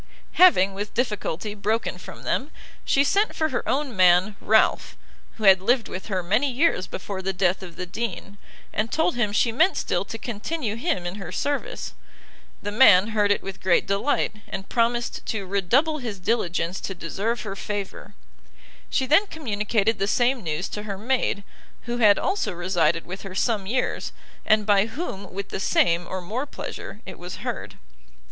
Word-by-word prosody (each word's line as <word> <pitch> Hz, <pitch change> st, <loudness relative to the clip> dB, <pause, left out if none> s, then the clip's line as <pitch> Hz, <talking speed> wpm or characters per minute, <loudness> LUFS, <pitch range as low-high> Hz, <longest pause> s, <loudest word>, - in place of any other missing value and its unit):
Having, 200 Hz, -, +6 dB
with 205 Hz, +2 st, -5 dB
difficulty, 210 Hz, -4 st, -2 dB
broken 215 Hz, +2 st, -1 dB
from -, -, -11 dB
them, 275 Hz, -, -1 dB, 0.3 s
she 275 Hz, -, +3 dB
sent 405 Hz, +9 st, +1 dB
for 315 Hz, 0 st, 0 dB
her 250 Hz, -, -3 dB
own 275 Hz, -3 st, -1 dB
man, 185 Hz, +2 st, +5 dB
Ralph, 220 Hz, +1 st, +2 dB, 0.4 s
who 220 Hz, -, -8 dB
had 190 Hz, -2 st, +7 dB
lived 235 Hz, +3 st, +2 dB
with 185 Hz, -, -7 dB
her 190 Hz, -4 st, -1 dB
many 220 Hz, +11 st, +2 dB
years 250 Hz, -, +1 dB
before 190 Hz, 0 st, -5 dB
the 190 Hz, +1 st, -2 dB
death 185 Hz, 0 st, +1 dB
of 180 Hz, -3 st, -9 dB
the 180 Hz, -, -4 dB
Dean, 200 Hz, 0 st, -5 dB, 0.3 s
and 220 Hz, +2 st, -1 dB
told 320 Hz, +2 st, +2 dB
him 225 Hz, -4 st, +1 dB
she 230 Hz, +3 st, +2 dB
meant 315 Hz, +12 st, +3 dB
still -, -, 0 dB
to -, -, -6 dB
continue 235 Hz, +1 st, -3 dB
him 240 Hz, -, -1 dB
in 175 Hz, +3 st, -4 dB
her 175 Hz, -, -6 dB
service. 290 Hz, -, -3 dB, 0.7 s
The 205 Hz, -, -3 dB
man 210 Hz, -3 st, +6 dB
heard 210 Hz, -2 st, +2 dB
it 205 Hz, -, +1 dB
with 195 Hz, -1 st, -7 dB
great 185 Hz, -2 st, +3 dB
delight, 200 Hz, +3 st, 0 dB
and 195 Hz, 0 st, -6 dB
promised 235 Hz, 0 st, 0 dB
to 205 Hz, -3 st, -2 dB
re 200 Hz, +1 st, 0 dB
double 295 Hz, -, +2 dB
his 230 Hz, -6 st, -5 dB
diligence 180 Hz, -3 st, -1 dB
to 195 Hz, -, -5 dB
deserve 200 Hz, +8 st, -2 dB
her 200 Hz, -3 st, -5 dB
favour. 205 Hz, -1 st, -5 dB, 0.7 s
She 265 Hz, -, +1 dB
then 320 Hz, +10 st, +4 dB
communicated 220 Hz, -, -1 dB
the 195 Hz, -, +1 dB
same 245 Hz, +3 st, +2 dB
news 165 Hz, +1 st, -2 dB
to 210 Hz, -, -5 dB
her 205 Hz, -2 st, -5 dB
maid, 225 Hz, -2 st, 0 dB, 0.4 s
who 240 Hz, 0 st, -3 dB
had 205 Hz, -3 st, +6 dB
also 385 Hz, -, -1 dB
resided 170 Hz, -2 st, +1 dB
with 190 Hz, +2 st, -7 dB
her 195 Hz, -2 st, -8 dB
some 205 Hz, -2 st, 0 dB
years, 250 Hz, +4 st, -1 dB, 0.3 s
and 215 Hz, -1 st, +4 dB
by 205 Hz, 0 st, +4 dB
whom 220 Hz, -, -6 dB
with 195 Hz, +1 st, -5 dB
the -, -, -4 dB
same, 175 Hz, -2 st, +2 dB
or 185 Hz, -, -4 dB
more 230 Hz, +11 st, -4 dB
pleasure 215 Hz, -5 st, -7 dB
it 185 Hz, -, -9 dB
was 175 Hz, 0 st, -8 dB
heard. -, -, -5 dB
210 Hz, 180 wpm, -24 LUFS, 190-240 Hz, 0.7 s, had